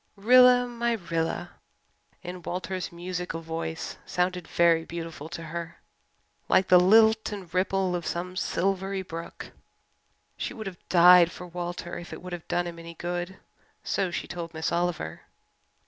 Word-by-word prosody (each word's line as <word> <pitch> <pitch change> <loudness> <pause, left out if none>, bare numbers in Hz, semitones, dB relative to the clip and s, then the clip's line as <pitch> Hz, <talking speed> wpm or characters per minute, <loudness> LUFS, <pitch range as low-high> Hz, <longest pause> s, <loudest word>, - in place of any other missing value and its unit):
"Rilla 250 +4 +6
my 235 -1 -1
Rilla" 170 -6 -2 0.7
in 180 0 -7
Walter's 185 +1 -4
musical 180 0 -4
voice 160 0 -5
sounded 180 -1 -1
very 170 -1 +3
beautiful 165 -2 -7
to 170 0 -6
her 170 +1 -6 0.7
like 185 0 +4
the 180 - +8
lilt 220 +4 +5
and 190 -5 -8
ripple 185 0 +1
of 170 -2 -4
some 180 +2 -3
silvery 190 +1 -1
brook. 165 -2 -8 0.9
She - - -4
would 220 - -7
have 185 -3 -9
died 180 0 +7
for 180 - -9
Walter 175 0 -5
if 175 - -10
it - - -8
would 180 -1 -7
have 175 -2 -7
done 175 0 0
him 170 -1 -7
any 170 0 -10
good, 175 +2 -4 0.5
so 190 - 0
she 170 - -4
told 170 -2 -6
Miss 160 - -1
Oliver. 170 - -2
175 Hz, 150 wpm, -27 LUFS, 170-190 Hz, 0.9 s, the